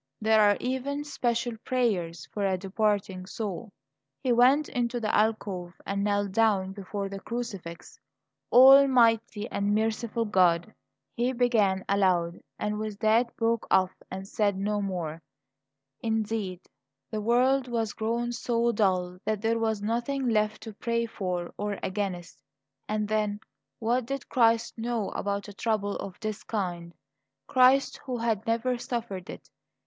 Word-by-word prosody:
There 220 0 +4
are 205 -1 +5
even 265 +3 -2
special 240 -4 -1
prayers 200 -10 -1
for 205 - -2
a 190 -1 +1
departing 195 -1 -1
soul. 210 +1 -5 0.5
He 255 - +1
went 255 +5 +5
into 240 -1 -1
the 215 -2 -2
alcove 200 -5 0
and 200 0 -1
knelt 205 -1 0
down 200 -3 +2
before 200 0 -5
the 195 0 -6
crucifix. 195 -7 -6 0.5
"Almighty 245 -5 +6
and 200 +1 0
merciful 225 +1 -1
God 185 -1 +2 0.2
" - - -57
he 245 +2 +1
began 220 -6 +2
aloud; 180 -4 +1 0.2
and 210 0 -2
with 215 -1 -4
that 230 +2 +3
broke 230 0 0
off 185 -1 +4 0.2
and 190 +1 -6
said 205 -1 0
no 205 +1 -1
more. 170 -5 -4 0.8
Indeed, 220 -5 -2 0.5
the 215 -1 -2
world 255 +4 +3
was 225 -3 -1
grown 235 +2 -1
so 235 0 0
dull 185 -4 0
that 215 -1 -2
there 230 +1 +1
was 220 -2 -1
nothing 240 +5 -1
left 215 -2 +1
to 220 -1 -8
pray 230 +2 -1
for 180 -6 -4
or 205 -1 -2
against. 185 -3 -4 0.5
And 210 0 -1
then, 210 -1 0 0.4
what 235 +1 0
did 275 +1 -5
Christ 230 -1 +2
know 230 -2 -1
about 200 0 -3
a 205 - -9
trouble 205 -1 -1
of 190 -2 -7
this 215 -2 -4
kind 175 -5 -4 0.5
Christ, 260 +1 +4
who 255 -2 -3
had 225 -1 -1
never 235 +2 0
suffered 225 -7 -4
it? - - -9
215 Hz, 145 wpm, -28 LUFS, 195-235 Hz, 0.8 s, Almighty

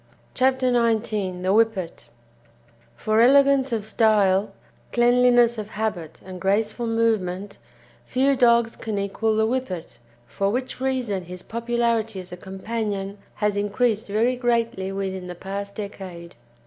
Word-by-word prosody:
CHAPTER 260 -1 +2
XIX 215 -6 0
THE 190 +1 +2
WHIPPET 215 -6 0 0.9
For 215 - +1
elegance 275 +1 +5
of 220 -3 -2
style, 210 -3 +3 0.4
cleanliness 240 -1 +4
of 210 -1 -6
habit, 190 -8 -4
and 185 -1 -9
graceful 215 +4 0
movement, 205 -4 -1 0.5
few 275 +2 +2
dogs 235 -2 +3
can 215 -2 -4
equal 205 +2 0
the 220 0 +2
Whippet, 225 -8 -4 0.3
for 195 +9 -1
which 255 +3 -3
reason 245 -8 -1
his 180 +1 -8
popularity 230 -2 -1
as 180 0 -10
a 180 - -7
companion 200 +1 -4 0.2
has 210 -1 0
increased 210 +2 0
very 225 +5 +1
greatly 230 -6 0
within 190 -2 -4
the 180 - -7
past 200 +2 -6
decade. 185 -5 -8
215 Hz, 130 wpm, -23 LUFS, 195-235 Hz, 0.9 s, elegance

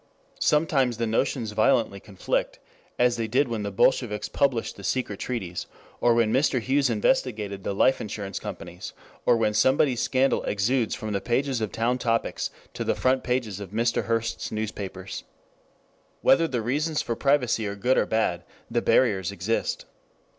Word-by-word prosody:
Sometimes 140 -6 +2
the 115 - 0
notions 115 0 0
violently 110 -1 +2
conflict, 100 -2 -2 0.4
as 120 -1 +3
they 115 -1 -1
did 130 +5 +2
when 115 -3 -3
the 100 - -2
bolsheviks 105 +2 +1
published 130 -5 0
the 100 - -12
secret 105 -3 -2
treaties, 95 -8 -4 0.3
or 120 -1 +4
when 115 -2 +2
Mr. 130 -1 +2
Hughes 135 +3 +1
investigated 105 -3 0
the 100 - -2
life 130 +6 +3
insurance 100 -2 -5
companies, - - -7 0.3
or 120 - +5
when 110 -2 +1
somebody's 130 +1 +3
scandal 130 +1 +2
exudes 115 +4 +1
from 110 -1 -5
the 100 - -1
pages 130 0 0
of 110 - -2
Town 120 +3 0
Topics 115 -2 -1 0.2
to - - -3
the - - 0
front 130 0 +1
pages 125 -6 -1
of 100 -3 -7
Mr. 115 +3 0
Hearst's 115 0 -2
newspapers. 100 -3 -5 1.0
Whether 165 +4 +5
the 125 -6 -2
reasons 150 +6 0
for 115 - -2
privacy 125 -5 +1
are 100 - -4
good 125 +6 +2
or - - +1
bad, 90 -6 0 0.3
the - - +1
barriers 100 -7 +2
exist. 100 +4 -2
115 Hz, 160 wpm, -26 LUFS, 105-130 Hz, 1.0 s, or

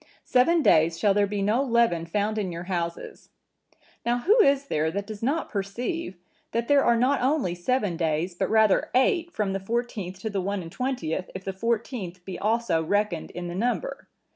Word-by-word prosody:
Seven 315 +6 +3
days 165 +1 +4
shall 200 +3 +3
there 205 0 +2
be 200 0 -2
no 215 +6 +2
leaven 235 -10 +2
found 210 +4 -1
in 190 -4 -2
your 170 0 -6
houses.' 170 -2 -4 0.7
Now, 240 +1 +1
who 415 - +4
is 280 -5 +3
there 155 - 0
that 200 +4 -3
does 215 -1 -8
not 285 +8 0
perceive, 215 - -3 0.4
that 235 0 -1
there 285 -1 +5
are 235 - +4
not 260 +4 +2
only 260 - +1
seven 195 0 -1
days, 165 +2 -1
but 175 - -2
rather 220 -2 +3
eight, 335 +7 +3
from 205 - -1
the 195 - -1
fourteenth 205 -3 -3
to 220 - -3
the 195 -1 -1
one 200 0 -2
and 165 - -9
twentieth, 190 -10 -3
if 190 - -6
the 195 - -4
fourteenth 210 -4 -3
be 190 - -6
also 220 -6 +1
reckoned 205 -1 0
in 175 0 -6
the 175 - -5
number? 245 - -2
205 Hz, 190 wpm, -26 LUFS, 180-245 Hz, 0.7 s, there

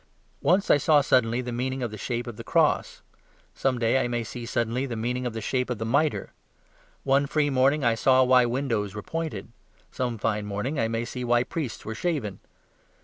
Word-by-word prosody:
Once 190 +3 +3
I - - +6
saw 150 0 +4
suddenly 125 -3 +2
the 125 -1 -5
meaning 130 +2 -2
of 120 - -3
the - - -6
shape 120 +3 -3
of 120 -3 -7
the - - -8
cross; - - +1 0.5
some 130 -2 0
day 120 +3 +2
I - - -1
may 120 -1 -2
see 115 +2 -7
suddenly 120 +2 -1
the 120 - -4
meaning 125 +3 -2
of 120 - -5
the 110 - -4
shape 125 +4 -1
of 125 - -2
the 110 - -4
mitre. 145 +6 0 0.7
One 140 +1 +2
fine 145 -1 +1
morning 135 +3 +3
I 120 -1 +4
saw 130 +3 +4
why 125 -1 +5
windows 115 -5 -1
were 105 - -6
pointed; 160 -12 -4 0.4
some 120 -2 -2
fine 105 -1 -1
morning 105 +9 -3
I 115 - +2
may 115 +1 -2
see 125 +1 -5
why 120 0 +3
priests 130 -8 -5
were 110 - -4
shaven. 120 - -2
125 Hz, 205 wpm, -26 LUFS, 115-135 Hz, 0.7 s, I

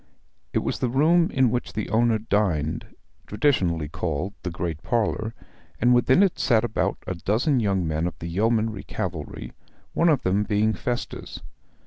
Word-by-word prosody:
It - - 0
was - - -2
the 125 - 0
room 165 +7 +4
in 130 -3 +2
which 120 -8 -2
the 110 +1 -3
owner 115 0 +3
dined 95 -8 0 0.4
traditionally 95 - +1
called 85 +4 -3
the 90 - -3
great 85 -2 -4
parlour 115 -1 -1 0.4
and 125 +2 +4
within 130 +9 +5
it 195 - +1
sat 115 -5 +3
about 120 -2 -1
a - - -2
dozen 110 - +1
young 95 -6 0
men 80 +2 0
of 90 - -6
the - - -7
yeomanry 110 +3 0
cavalry, 80 -5 -5 0.4
one 170 - +3
of 150 -5 +2
them 95 +2 +2
being 105 +1 +1
Festus. 120 +6 -4
110 Hz, 160 wpm, -25 LUFS, 90-120 Hz, 0.4 s, within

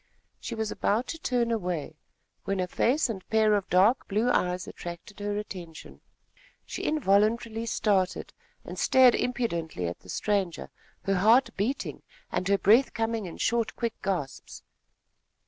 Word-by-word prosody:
She 235 - -5
was 220 -1 -2
about 220 +5 0
to 325 - -5
turn 245 -5 0
away, 180 -8 -2 0.5
when 195 -1 -1
a 185 - +1
face 255 - +1
and 200 -6 -6
pair 220 -1 +4
of 200 -2 0
dark 200 +8 +4
blue 215 +5 +1
eyes 180 -3 0
attracted 175 +4 -9
her 205 0 -2
attention. 180 -6 -8 0.6
She - - -5
involuntarily 225 -3 +1
started 195 -5 0 0.3
and - - -7
stared 255 -2 +6
impudently 170 - -2
at 85 0 -4
the 90 - -17
stranger, 195 - -1 0.3
her 195 -1 +1
heart 225 +8 +5
beating, 230 +8 -2 0.3
and 185 - -1
her 200 0 +3
breath 225 +8 +4
coming 225 -3 -1
in 170 - -9
short 235 -1 0
quick 235 -2 -2
gasps. 175 -9 -4
210 Hz, 145 wpm, -28 LUFS, 185-230 Hz, 0.6 s, stared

